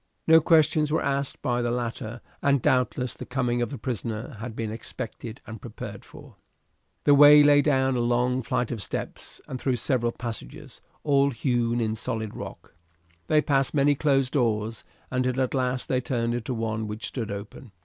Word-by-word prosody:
No 160 0 +7
questions 155 -1 +3
were 160 - +1
asked 140 0 -1
by 125 -3 0
the 120 - 0
latter, 120 -1 -4 0.2
and 140 -1 +3
doubtless 125 0 +1
the - - -8
coming 125 -2 -1
of 120 - -1
the 140 - -6
prisoner 115 +1 -4
had 115 0 -6
been 115 -2 -3
expected 115 +1 -7
and 110 -1 -9
prepared - - -8
for. - - -15 0.7
The 145 - +5
way 145 +1 +9
lay 145 0 +6
down 135 -3 +2
a - - 0
long 125 +2 +1
flight 125 0 -1
of 115 -4 -4
steps - - -6
and 130 - -6
through 130 -2 +1
several 120 0 0
passages, 115 - -8 0.2
all 140 -1 +3
hewn 120 -2 0
in 110 -2 0
the 110 - -4
solid 110 -1 -4
rock. - - -9 0.5
They 150 -1 +3
passed 135 0 +1
many 145 0 +4
closed 135 -2 +1
doors, 115 -4 0 0.3
until 130 0 0
at 130 -1 0
last 130 -1 -1
they 130 -1 +1
turned 120 -2 -1
into 120 +1 -3
one 110 -1 -2
which 105 +2 -5
stood 115 -5 -4
open. 100 +4 -8
125 Hz, 180 wpm, -26 LUFS, 115-135 Hz, 0.7 s, way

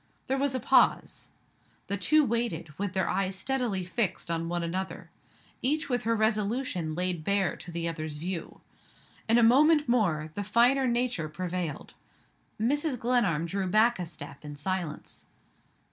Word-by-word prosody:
There 270 0 -1
was 275 -1 0
a - - 0
pause. - - +2 0.6
The 200 - -2
two 305 +9 +4
waited, 225 -10 -2
with 200 -2 -2
their 190 -1 0
eyes 190 0 0
steadily 235 -3 -1
fixed 185 -2 -2
on 165 0 -2
one 175 0 -1
another 185 +3 -4 0.5
each 300 +4 +1
with 245 -3 -1
her 230 0 +2
resolution 215 -5 0
laid 180 -2 -1
bare 200 +1 +1
to - - -10
the 170 0 -2
other's 155 -2 -4
view. 170 +2 -5 0.7
In 230 - +6
a 240 - +5
moment 295 +6 +5
more, 170 -11 +1
the 205 - -3
finer 240 +6 +3
nature 240 -9 0
prevailed. 175 -1 -4 0.7
Mrs. 285 +4 0
Glenarm 225 -10 +1
drew 190 +2 -2
back 220 +4 +3
a 175 - -3
step 145 -3 -9
in 145 -1 -7
silence. 165 0 -4
195 Hz, 155 wpm, -28 LUFS, 170-240 Hz, 0.7 s, In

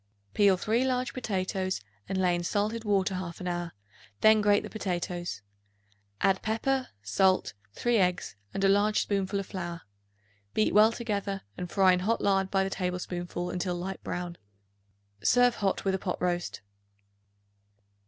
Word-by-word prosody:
Peel 200 -2 +5
3 225 +6 +1
large 255 -1 0
potatoes 190 -5 -2 0.3
and 190 - -1
lay 180 -1 +3
in 175 0 -1
salted 210 +5 -1
water 195 -3 +1
half 185 -2 -5
an 180 - -5
hour; 175 -1 -2 0.5
then 215 0 +6
grate 205 0 +4
the - - -7
potatoes; 175 - -3 0.8
add 195 -1 +3
pepper, 255 +4 0 0.2
salt, 185 - +2 0.2
3 240 - +1
eggs 180 - +1 0.2
and 195 - -3
a - - +6
large 205 +2 +3
spoonful 200 0 -1
of 195 - -4
flour. 175 -3 -6 0.7
Beat 215 - +2
well 215 +2 +7
together 205 -4 -3
and 180 - -5
fry 190 -1 +5
in 180 - +1
hot 220 +5 +1
lard 195 -1 +2
by 195 0 +2
the 195 - -3
tablespoonful 180 -1 -3
until 180 0 -2
light 185 +2 -5
brown. 175 -1 -4 0.8
Serve 245 - +5
hot 195 -1 -1
with 195 - +2
a 190 - 0
pot - - -3
roast. 175 -1 -2
190 Hz, 155 wpm, -29 LUFS, 180-210 Hz, 0.8 s, well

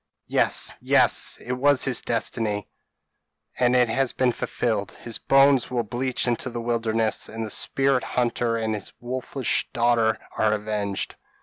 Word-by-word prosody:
Yes! - - +2
yes! - - +3
it 125 - -7
was 140 +2 +3
his 135 -3 +1
destiny, 110 -3 -2 0.9
and 125 0 +3
it 125 -1 +4
has 135 +2 +1
been 130 -1 +2
fulfilled. 110 -3 -2
His 115 -2 -6
bones 135 -2 +4
will 120 -2 -1
bleach 125 +4 -2
in 120 - +2
the 120 -2 -4
wilderness, 115 -1 -1
and 115 0 -5
the 105 - -5
spirit 135 +2 +1
hunter 120 -1 -1
and 110 -1 -1
his 105 -3 -6
wolfish 130 +1 -2
daughter 115 -2 +2 0.2
are 110 -1 +2
avenged." 105 -2 -3
120 Hz, 145 wpm, -24 LUFS, 110-125 Hz, 0.9 s, it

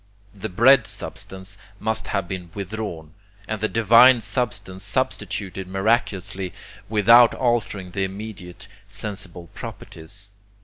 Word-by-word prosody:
The 100 - -6
bread 125 +9 +5
substance 95 +1 -5 0.2
must 110 0 -1
have 100 -3 -1
been 90 -2 -6
withdrawn, 100 -6 -5 0.3
and 110 -1 -3
the 110 - +2
divine 115 +3 +6
substance 105 -4 -2
substituted 95 -1 -2
miraculously 95 -2 0 0.4
without 115 +3 +6
altering 115 -7 -1
the 95 +2 -1
immediate 95 -2 -7 0.2
sensible 95 -5 -6
properties. 100 +5 -9
100 Hz, 105 wpm, -23 LUFS, 95-110 Hz, 0.4 s, divine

